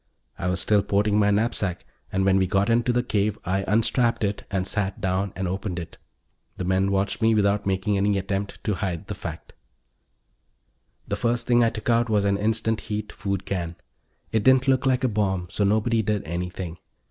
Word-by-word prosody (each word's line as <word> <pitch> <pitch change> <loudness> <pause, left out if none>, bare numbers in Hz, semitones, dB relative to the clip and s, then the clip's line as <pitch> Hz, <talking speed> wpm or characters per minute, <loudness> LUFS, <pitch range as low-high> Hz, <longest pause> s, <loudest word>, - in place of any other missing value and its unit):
I 90 - -2
was 90 0 0
still 105 +3 +3
porting 100 +1 +1
my 105 -1 +4
knapsack, 105 -3 0 0.3
and 95 0 +1
when 95 0 +4
we 95 -1 +2
got 100 +4 +2
into 120 +1 +2
the 120 0 +1
cave 105 -2 0
I 95 +2 0
unstrapped 115 +3 +2
it 100 0 -2
and 95 -2 -1
sat 100 -1 -2
down 95 +1 -1
and 95 -1 -2
opened 95 0 -3
it. 85 -2 -7 0.6
The - - -3
men 95 +2 +1
watched 100 +3 0
me 110 0 +4
without 100 -1 +2
making 95 +1 +1
any 100 +1 +2
attempt 95 +1 -3
to 105 - 0
hide 95 -4 -3
the - - -5
fact. - - -8 1.5
The - - -1
first 120 0 0
thing 120 -1 +4
I 115 - +4
took 115 +1 -2
out 115 0 +2
was 105 -2 +2
an 100 0 +2
instant 110 +1 0
heat 105 0 -3
food 100 -2 -3
can. 85 -3 -3 0.6
It 110 -2 +1
didn't 130 0 +5
look 135 0 +3
like 130 -1 +2
a - - +4
bomb, 100 -5 0
so 105 - 0
nobody 110 +3 +2
did 105 -1 -1
anything. 85 +1 -5
100 Hz, 195 wpm, -25 LUFS, 95-110 Hz, 1.5 s, didn't